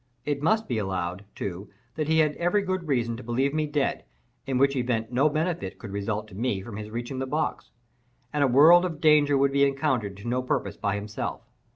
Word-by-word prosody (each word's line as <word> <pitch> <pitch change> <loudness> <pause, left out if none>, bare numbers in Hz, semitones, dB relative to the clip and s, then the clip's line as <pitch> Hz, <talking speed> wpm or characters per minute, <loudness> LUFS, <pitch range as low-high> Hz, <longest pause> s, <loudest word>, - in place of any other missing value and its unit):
It 145 -1 -1
must 220 +8 +2
be 120 -3 -1
allowed, 95 -1 -3
too, 95 +1 -5 0.2
that 155 -1 -2
he 160 0 +2
had 155 -2 +3
every 190 +4 +1
good 185 -3 -2
reason 120 -5 0
to 130 - -9
believe 130 +4 0
me 155 0 0
dead; 145 -1 -1 0.4
in 135 -1 0
which 140 +1 +3
event 120 -3 -1
no 135 +5 +3
benefit 155 - -2
could 105 - -9
result 105 +1 -3
to 95 - -12
me 110 -2 -1
from 105 +1 -8
his 105 0 -6
reaching 120 +4 -5
the 130 - -2
box, 155 +4 -2 0.6
and 145 -1 +2
a - - +4
world 155 +8 +7
of 165 -5 -3
danger 150 -2 +5
would 140 0 +3
be 140 0 +3
encountered 135 -8 0
to 100 +4 -9
no 125 +2 0
purpose 105 -5 -2
by 100 -1 -1
himself. 105 +1 -4
130 Hz, 215 wpm, -26 LUFS, 110-150 Hz, 0.6 s, world